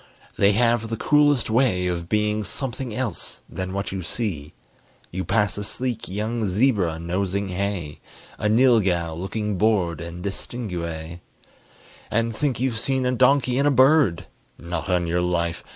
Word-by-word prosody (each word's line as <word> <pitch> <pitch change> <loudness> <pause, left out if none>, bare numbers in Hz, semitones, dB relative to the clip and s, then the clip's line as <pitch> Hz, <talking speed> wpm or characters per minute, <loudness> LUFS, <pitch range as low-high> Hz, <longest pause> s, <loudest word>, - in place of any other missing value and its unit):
They 100 +1 +4
have 115 0 +2
the 115 - -3
coolest 145 -5 +3
way 110 -7 +2
Of 85 -1 -2
being 105 0 +1
something 120 +4 -4
else 115 0 -4
than 95 0 -5
what 100 +1 -3
you 95 -1 -3
see: 90 -6 -4 0.6
You 95 +2 -3
pass 105 +2 +1
a - - -3
sleek 120 +2 -3
young 110 +4 -2
zebra 100 -5 +2
nosing 95 +4 -2
hay, 90 -5 -3 0.4
A 105 - +1
nylghau 105 -9 +3
looking 95 +3 -3
bored 95 -8 +2
and 85 +2 -7
distingué, 85 -6 -5 0.9
And 115 0 0
think 135 0 -1
you've 125 -3 0
seen 130 +2 0
a 125 - +2
donkey 130 0 +3
and 140 - +3
a - - +5
bird. 130 - +4 0.3
Not 85 +1 -5
on 90 -1 +2
your 85 +1 0
life! 85 -1 -1
105 Hz, 150 wpm, -23 LUFS, 90-120 Hz, 0.9 s, a